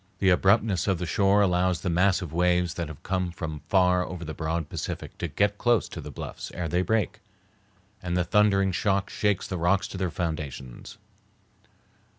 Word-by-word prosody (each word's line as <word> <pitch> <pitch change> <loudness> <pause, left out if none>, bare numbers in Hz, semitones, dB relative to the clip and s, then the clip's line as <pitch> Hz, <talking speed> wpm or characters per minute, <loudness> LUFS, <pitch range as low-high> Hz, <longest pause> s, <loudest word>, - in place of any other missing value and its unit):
The 95 0 +3
abruptness 95 0 +3
of 95 -3 +2
the 90 - -3
shore 100 +5 +3
allows 90 -1 +1
the - - -1
massive 90 -2 +1
waves 90 0 +2
that 85 -2 -4
have 75 -1 -10
come 90 -1 -1
from 80 -3 -5
far 90 -1 +4
over 90 -2 -6
the 80 - -5
broad 80 +1 -2
Pacific - - -5
to - - -2
get 105 0 0
close 120 -4 +2
to - - -7
the - - -8
bluffs - - -7
ere 90 - -2
they 90 +3 +1
break, 110 +3 0 0.8
and 90 0 -2
the 90 - +2
thundering 100 0 +3
shock 100 +2 0
shakes 105 -2 0
the 95 - -4
rocks 90 +2 +2
to - - -6
their 95 -2 0
foundations. 75 -8 -5
90 Hz, 180 wpm, -26 LUFS, 85-100 Hz, 0.8 s, far